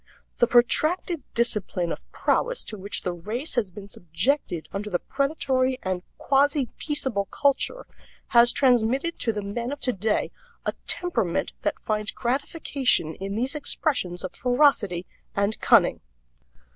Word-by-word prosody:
The 240 - +5
protracted 310 +8 +2
discipline 205 -7 0
of - - -7
prowess - - 0
to 220 - -6
which 200 0 -1
the 180 - -1
race 215 - -4
has 225 -6 0
been 200 +2 -10
subjected 175 - -1
under 210 +1 -3
the 180 - +1
predatory 265 - 0
and 185 -1 -2 0.2
quasi 280 -2 +2
peaceable 265 -9 0
culture 285 - 0 0.4
has 240 0 +7
transmitted 260 +5 +2
to 230 - +1
the 210 -2 -4
men 235 +5 -3
of 290 - -5
today 220 -5 0 0.3
a - - 0
temperament 225 - -1
that - - -1
finds 215 0 -1
gratification 260 - 0
in 195 +4 -5
these 250 +4 -1
expressions 280 - -1
of 185 - -5
ferocity 245 - +2 0.3
and 200 +2 0
cunning. - - +4
235 Hz, 135 wpm, -25 LUFS, 200-275 Hz, 0.4 s, has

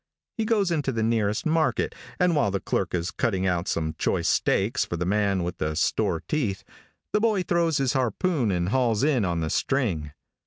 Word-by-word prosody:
He 225 - -1
goes 210 -5 +1
into 150 -5 0
the 115 -3 -1
nearest 110 +2 0
market, 160 0 +1 0.3
and 180 -2 +3
while 145 -9 +2
the 100 0 -1
clerk 95 0 -1
is 85 0 -2
cutting 95 -6 -1
out 90 -1 0
some 80 -1 -1
choice - - 0
steaks 115 +9 +1
for 85 - -4
the 90 - -2
man 100 -1 +1
with 85 0 -4
the 75 0 -1
store 80 - 0
teeth, 115 -11 -1 0.5
the 210 - +2
boy 215 -4 +2
throws 170 -3 +1
his 135 -3 +1
harpoon 130 - 0
and 90 -1 0
hauls 120 -2 +1
in 140 -6 +2
on 85 -3 -1
the 80 - -2
string. 95 - 0
110 Hz, 195 wpm, -25 LUFS, 90-155 Hz, 0.5 s, and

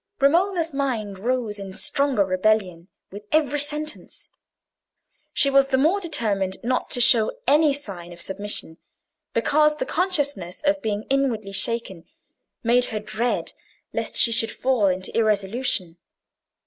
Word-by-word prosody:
Romola's 335 +3 +2
mind 230 -8 -2
rose 230 -2 -2
in 195 -1 -7
stronger 280 -5 +2
rebellion 185 -2 0 0.2
with 205 +2 -9
every 295 -2 +2
sentence. 300 +1 -2 1.0
She - - +3
was 275 0 +5
the 265 -1 +1
more 320 +9 +3
determined 210 - -1
not 250 +2 -1
to - - 0
show 230 -2 +5 0.2
any 300 0 +5
sign 195 -11 -6
of 170 - -11
submission, 190 -4 -3 0.6
because 300 +6 +3
the - - -3
consciousness 285 - -1
of 295 0 +2
being 210 -3 -2
inwardly 240 -7 0
shaken 195 -4 -1 0.6
made 245 +1 +3
her 215 - -4
dread 215 +3 -2 0.4
lest - - -3
she 230 - +3
should 225 -1 0
fall 250 -6 +1
into 185 0 -2
irresolution. 210 -4 0
235 Hz, 135 wpm, -23 LUFS, 200-285 Hz, 1.0 s, was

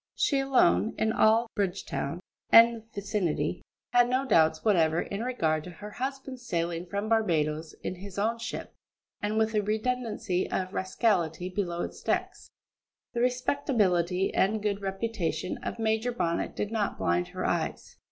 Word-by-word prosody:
She 280 - +2
alone, 250 - +3
in 220 - +1
all 225 +2 +4
Bridgetown 180 -5 -2 0.3
and 230 -1 +6
vicinity, 200 -5 -1 0.3
had 245 0 +5
no 260 +2 +1
doubts 160 -8 +3
whatever 165 -6 +3
in 200 +4 -3
regard 160 -11 0
to - - -7
her 205 +4 -9
husband's 265 +1 -5
sailing 170 -1 -2
from 200 +4 -3
Barbadoes 160 -8 0
in - - -2
his 195 +1 -9
own 225 +3 0
ship, - - -6 0.5
and 210 +1 -1
with 220 0 +2
a 210 - +2
redundancy 220 -3 -1
of 185 +1 -2
rascality 185 -3 0
below 180 -3 -2
its - - -7
decks. - - -2 0.6
The 235 - -1
respectability 210 - +1
and 215 +3 +2
good 205 -1 -1
reputation 195 -4 -2
of - - -5
Major 220 +2 0
Bonnet 170 -8 -1
did 210 - -3
not 215 -3 -1
blind 85 +1 +1
her - - -5
eyes. - - -2
205 Hz, 150 wpm, -28 LUFS, 175-230 Hz, 0.6 s, and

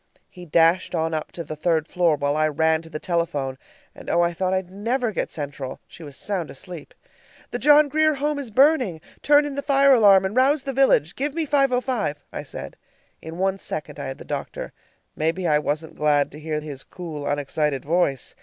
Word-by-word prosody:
He 180 -2 -12
dashed 165 +3 +3
on 160 0 -1
up 155 -1 -3
to 170 - -5
the 155 0 -7
third 160 0 0
floor 175 -3 +2
while 145 0 -1
I 155 0 +2
ran 160 +1 +1
to 165 - -13
the 155 - -5
telephone 150 -6 -2 0.3
and - - -10
oh, 175 - +3
I 170 0 0
thought 185 +2 -1
I'd 190 -1 -2
never 230 +4 -1
get - - -2
Central! 140 -3 -6
She - - -14
was 145 -3 -8
sound 190 -6 -2
asleep. 170 +2 -9 0.6
"The 245 - -3
John 295 +2 +6
Grier 310 +1 +2
Home 290 +1 -1
is 270 -4 -6
burning! 255 - +3 0.2
Turn 290 0 +5
in 290 - -4
the 280 - -3
fire 275 -1 +4
alarm 200 -5 +6
and 190 +3 -3
rouse 270 +3 +3
the 270 -1 -4
village. 215 - +3
Give 290 +2 -2
me 330 -1 0
505," 255 - 0
I - - -4
said. - - -9 0.4
In 160 +1 -8
one 190 +1 0
second 150 -4 -6
I - - -4
had 135 - -6
the - - -11
doctor. - - -5 0.4
Maybe 165 +4 -1
I 150 -3 +3
wasn't 155 +2 -3
glad 150 -2 +1
to 150 - -11
hear 155 0 -3
his 145 -3 -7
cool, 155 -5 -7
unexcited 145 -1 -1
voice! 155 -5 0
170 Hz, 205 wpm, -23 LUFS, 150-255 Hz, 0.6 s, John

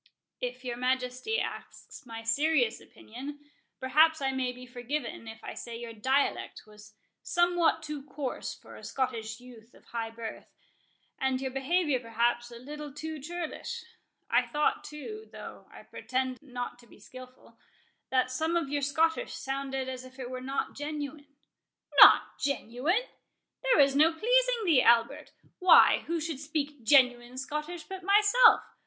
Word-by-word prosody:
"If 250 +1 -5
your 240 -1 -3
Majesty 255 - -1
asks - - -7
my 225 -1 -7
serious 255 +1 +2
opinion, 275 +6 -10 0.4
perhaps 310 +5 +4
I 270 -1 0
may 260 -1 -1
be 250 0 -11
forgiven 250 0 -5
if 220 0 -10
I - - -6
say 235 -1 -7
your 235 -1 -7
dialect 260 +6 0
was 210 0 -16 0.3
somewhat 345 -2 +2
too 300 -2 -5
coarse 280 -2 -5
for - - -14
a - - -12
Scottish 240 -5 -3
youth 240 -2 -15
of - - -20
high 230 -1 -4
birth, 225 0 -8 0.7
and 265 -1 0
your 265 -1 -3
behaviour 280 +1 +1
perhaps 240 +1 0
a 235 - -10
little 295 +4 -8
too 310 +2 -6
churlish. 340 +3 -6 0.4
I - - +2
thought 300 0 0
too—though 430 +9 -9
I - - -12
pretend 255 0 -3
not 245 -3 -6
to 240 - -18
be - - -17
skilful—that 255 +1 -6
some 320 +6 -1
of 330 -5 -2
your 290 0 -1
Scottish 320 - +1
sounded 270 -1 -3
as 255 -1 -5
if 255 +1 -14
it 255 -1 -6
were 255 0 -5
not 270 +2 -3
genuine." 290 0 -6 0.7
"Not - - +8
genuine?—there 310 - -2
is 275 -1 +5
no 310 +3 +5
pleasing 485 +6 +2
thee, 315 -8 +5
Albert.—Why, 235 +9 +4
who 335 +1 -1
should 315 -3 -4
speak 295 -2 -3
genuine 250 -1 +3
Scottish 300 +5 -4
but 380 -1 -8
myself? 420 +5 +6
270 Hz, 145 wpm, -29 LUFS, 250-310 Hz, 0.7 s, Not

